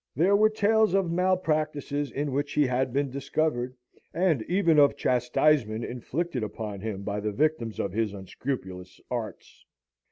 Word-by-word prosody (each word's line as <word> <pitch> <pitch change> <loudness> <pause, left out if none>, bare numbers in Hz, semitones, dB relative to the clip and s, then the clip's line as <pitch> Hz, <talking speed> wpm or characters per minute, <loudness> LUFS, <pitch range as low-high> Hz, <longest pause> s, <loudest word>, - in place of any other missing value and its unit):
There 180 +8 +4
were 215 +1 +5
tales 215 -2 +2
of 190 -4 +1
malpractices 155 -5 0
in 145 +1 -3
which 145 +2 -2
he 150 - +3
had 130 0 0
been 140 +1 0
discovered, 135 -2 -1 0.4
and 170 -7 +2
even 170 -4 +4
of 145 -1 +5
chastisement 125 -2 +2
inflicted 130 +4 -3
upon 105 -2 -5
him 100 -2 -4
by 105 0 -2
the 105 +1 -2
victims 125 -2 0
of 100 - -1
his 110 -1 0
unscrupulous 95 -2 -6
arts. 115 -5 -6
140 Hz, 150 wpm, -27 LUFS, 110-160 Hz, 0.4 s, were